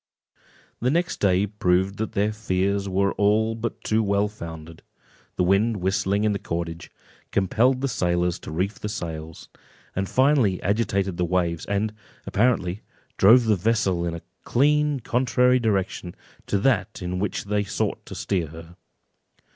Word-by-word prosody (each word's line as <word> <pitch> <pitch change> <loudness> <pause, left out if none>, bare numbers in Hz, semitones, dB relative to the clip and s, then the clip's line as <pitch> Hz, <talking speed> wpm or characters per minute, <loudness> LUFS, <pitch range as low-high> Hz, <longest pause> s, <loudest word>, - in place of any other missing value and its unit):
The 125 - +1
next 170 +5 0
day 95 0 +3
proved 95 -1 0
that 110 +1 -3
their 105 0 +1
fears 100 -1 -1
were 100 +1 +1 0.4
but 115 +1 -5
too 110 +1 +1
well 100 0 +1
founded; 80 -5 -9 0.5
the - - +1
wind 100 +5 +2
whistling 95 +2 0
in 110 - +2
the 100 - -3
cordage, 85 -1 -5 0.4
compelled 115 +7 +2
the 135 - +1
sailors 90 -6 0
to - - -9
reef 95 +6 -2
the 105 - -4
sails, 80 -6 -6 0.5
and 95 0 -2
finally 130 -8 +3
agitated 100 -3 0
the 90 - +1
waves, 85 -2 -1
and, 105 +1 -1 0.3
apparently, 105 -4 +1 0.4
drove 115 +5 +6
the 110 -1 +3
vessel 95 -3 +1
in 85 -1 -2
a 85 - -9 0.2
clean 150 +1 +2
contrary 125 +1 +2
direction 95 -5 -1 0.3
to 100 - +1
that 105 -3 0
in 90 +1 -3
which 105 - -2
they 105 0 0
sought 100 0 -2
to - - -8
steer 90 -5 -1
her. 80 +2 -12
100 Hz, 150 wpm, -24 LUFS, 90-110 Hz, 0.5 s, drove